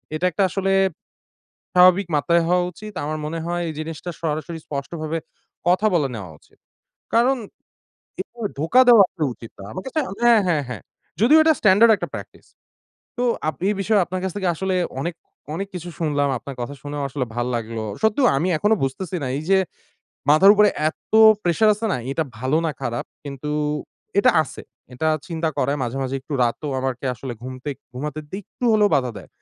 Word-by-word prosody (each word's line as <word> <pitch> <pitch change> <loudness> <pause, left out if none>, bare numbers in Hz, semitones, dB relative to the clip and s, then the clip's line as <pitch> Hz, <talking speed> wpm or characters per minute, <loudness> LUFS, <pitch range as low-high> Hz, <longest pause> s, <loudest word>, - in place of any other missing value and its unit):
এটা 165 +4 -1
একটা 195 - +1
আসলে 195 +1 -1 1.0
স্বাভাবিক 185 +2 +6
মাত্রায় 170 +4 +3
হওয়া 180 0 +3
উচিত। 210 +6 -10
আমার 155 +1 -3
মনে 165 +2 -4
হয় 175 0 -1
এই 160 - -3
জিনিসটা 160 +2 -5
সরাসরি 160 +1 -3
স্পষ্টভাবে 155 +3 -4 0.5
কথা 185 +4 +3
বলে 150 -5 +2
নেওয়া 100 -7 -7
উচিত। - - -28 0.6
কারণ, 250 +3 +4 0.8
এভাবে 230 -4 -5
ধোঁকা 165 +12 +5
দেওয়া 225 -5 +8
তো 155 - 0
উচিত 115 - -12
না। - - -8
আমার 185 - -6
কাছে 310 +4 -1 0.2
হ্যাঁ, 235 -2 +6
হ্যাঁ, 155 -4 +1
হ্যাঁ। 120 -5 -6 0.4
যদিও 295 +7 +7
এটা 320 0 +5
standard 215 +3 +6
একটা - - -5
practice. - - -10 0.7
তো 245 - 0 0.2
আপ 155 - -1
এই 210 - +2
বিষয়ে 205 +1 +3
আপনার 185 +1 -4
কাছ 190 - -1
থেকে 190 -2 -1
আসলে 190 +3 -1 0.3
অনেক, 170 +3 -3 0.4
অনেক 195 +3 -3
কিছু 175 0 -6
শুনলাম, 145 -3 +1
আপনার 140 +2 -9
কথা 140 +4 -4
শুনেও 145 0 -4
আসলে 130 -1 -2
ভাল 120 - -1
লাগলো। 115 -1 -4 0.2
সত্যি 220 +3 +2
ক - - +6
আমি 170 +6 0
এখনো 210 +6 +3
বুঝতেছি 170 +8 -3
না - - -1
এইযে, 185 +6 +2 0.7
মাথার 190 +7 +8
উপরে 210 0 +5 0.2
এত - - -12 0.3
প্রেশার 175 +5 +3
আছে 225 +2 -3
না, - - +1 0.2
এটা 160 - 0 0.2
ভালো 130 +5 0
না - - 0
খারাপ? 120 -3 -3 0.2
কিন্তু 140 +1 -6 0.7
এটা 200 - +6
আছে। - - -10 0.3
এটা 160 +6 0 0.2
চিন্তা 165 -1 -1
করায় 145 +1 +1
মাঝে, 120 +1 -3
মাঝে 130 0 -3
একটু 135 - -10
রাতও 120 +5 -2
আমাকে 130 0 -3
আসলে 125 +1 -6
ঘুমতে 130 +2 -6 0.2
ঘুমাতে 150 +4 -4
দিতে 190 - -5
একটু 245 - -9
হলেও 210 -1 +4
বাধা 125 -3 +1
দেয়। 95 - -13
165 Hz, 180 wpm, -22 LUFS, 140-195 Hz, 1.0 s, দেওয়া